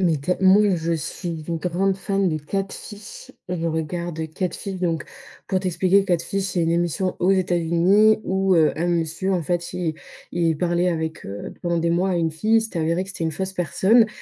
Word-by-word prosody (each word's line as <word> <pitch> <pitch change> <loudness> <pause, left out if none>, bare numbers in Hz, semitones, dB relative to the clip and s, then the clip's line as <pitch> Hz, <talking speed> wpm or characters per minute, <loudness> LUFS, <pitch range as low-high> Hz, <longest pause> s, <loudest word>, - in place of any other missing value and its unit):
Mais 170 -4 +3
tell 180 +6 -1
moi, 190 +2 +6
je 165 0 -1
suis 165 +1 -4
une 170 - -1
grande 185 +3 0
fan 195 0 0
de 155 -2 -1
Catfish, 200 - -6 0.2
je 175 -2 -2
regarde 160 0 -3
Catfish. 190 +2 -3
Donc, 165 -3 -1 0.4
pour 190 - +2
t'expliquer, 185 +1 +2
Catfish, 190 +1 -1
c'est 180 -3 -1
une 165 - +1
émission 175 +2 0
aux 185 +2 +3
États-Unis 185 +4 +3
où, 190 -1 +1
heu, 160 -3 +4
un 165 +2 -1
monsieur, 170 +2 0
en 180 -2 0
fait, 175 +2 -2
il 175 -3 -2 0.4
il 165 -2 +1
parlait 175 +1 +1
avec, 160 -2 -3
heu, 100 +1 -6
pendant 170 -1 0
des 170 0 +1
mois, 180 +3 +1
à - - +1
une 165 -1 +1
fille. 215 +8 +2
Il - - +5
s'était 220 -6 -5
avéré 165 +3 +1
que 190 - -8
c'était 185 -3 -4
une 160 - -1
fausse 190 +4 -3
personne. 195 +5 +3
175 Hz, 200 wpm, -23 LUFS, 165-190 Hz, 0.4 s, moi